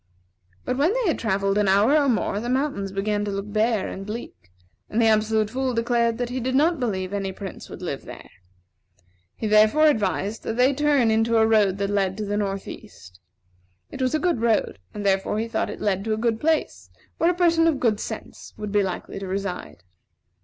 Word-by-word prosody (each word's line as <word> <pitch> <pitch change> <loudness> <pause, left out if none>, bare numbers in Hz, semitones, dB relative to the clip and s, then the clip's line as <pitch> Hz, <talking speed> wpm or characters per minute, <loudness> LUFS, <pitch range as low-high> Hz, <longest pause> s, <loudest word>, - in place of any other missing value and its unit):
But 250 - -1
when 310 +6 +3
they - - 0
had 325 - 0
travelled 200 -2 0
an 205 - +2
hour 205 +9 +4
or 290 -2 +3
more, 215 -3 0
the 240 +3 -4
mountains 255 -7 -1
began 205 +1 -1
to 205 - -3
look 200 +1 -5
bare 220 -1 +1
and 195 - -6
bleak, 195 - -8 0.4
and 220 - -1
the 230 - +4
Absolute 215 -1 +2
Fool 260 0 -1
declared 235 0 +1
that 245 -1 -2
he 255 - -2
did 255 +1 -2
not 320 +3 +3
believe 195 -6 -2
any 195 -1 -2
prince 190 0 -9
would - - -9
live - - -4
there. - - -10 1.1
He - - -5
therefore 215 +8 +5
advised 215 -5 +1
that 225 - -4
they 255 +3 +4
turn 280 -5 +2
into 225 +1 +2
a 220 - +5
road 210 -4 +3
that 200 0 -2
led 195 -1 0
to 215 - -3
the 205 0 -2
north 195 -2 -2
east. 90 +1 -12 0.7
It - - -7
was 255 +3 +1
a - - +1
good 340 -8 0
road; 225 - +1
and 205 - -6
therefore 195 +1 +1
he 225 +1 -1
thought 225 -1 -2
it - - -7
led 195 -2 0
to 220 - 0
a - - -7
good 225 0 0
place, 320 +3 -1 0.3
where 335 - +4
a 355 - +1
person 335 -2 +3
of 305 -5 +1
good 220 -4 +1
sense - - -8
would 210 -1 -5
be 205 0 +3
likely 190 0 -4
to 195 - -6
reside. 185 - -5
220 Hz, 215 wpm, -24 LUFS, 200-250 Hz, 1.1 s, therefore